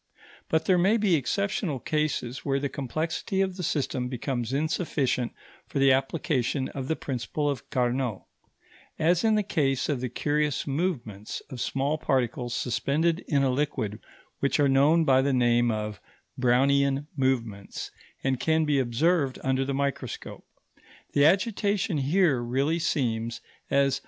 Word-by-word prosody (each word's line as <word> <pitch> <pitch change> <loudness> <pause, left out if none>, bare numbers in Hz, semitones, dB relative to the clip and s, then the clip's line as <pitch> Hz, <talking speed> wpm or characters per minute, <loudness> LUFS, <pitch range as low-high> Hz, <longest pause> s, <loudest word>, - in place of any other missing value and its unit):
But 160 - +1
there 185 -2 +4
may 200 +6 +4
be 205 -4 +2
exceptional 170 - 0
cases 145 -4 -2
where 140 0 0
the 140 0 -2
complexity 155 +8 -3
of 190 -1 0
the 185 - -5
system 135 -5 -1
becomes 125 -1 -3
insufficient 140 -4 0 0.4
for - - -5
the 135 0 +5
application 135 -1 0
of 135 -2 -5
the 160 - 0
principle 135 +3 -3
of 140 -5 -3
Carnot; 125 -3 -1 0.7
as 170 +4 +2
in 220 -1 +4
the 210 - +2
case 140 -9 0
of 140 -4 -1
the 125 - -2
curious 150 +1 0
movements 135 - -3
of 125 -2 -5
small 140 +3 -1
particles 125 -2 -1
suspended 160 +7 0
in 140 -3 +2
a 135 - +2
liquid 125 -6 -2 0.4
which 140 - +1
are 145 - +5
known 145 +5 +4
by 130 -2 +5
the 140 0 +1
name 120 -1 +3
of 105 -4 -3 0.3
Brownian 135 +3 +2
movements 120 -7 -2 0.3
and 130 -2 0
can 160 +3 +2
be 145 -2 +2
observed 135 +3 +1
under 130 0 +1
the 135 0 -2
microscope. 140 0 -3 0.7
The 145 - +5
agitation 195 -1 +2
here 145 -2 +2
really 135 +7 0
seems, 115 -7 -1 0.3
as 140 -1 +3
M. - - -10
140 Hz, 150 wpm, -27 LUFS, 125-155 Hz, 0.7 s, the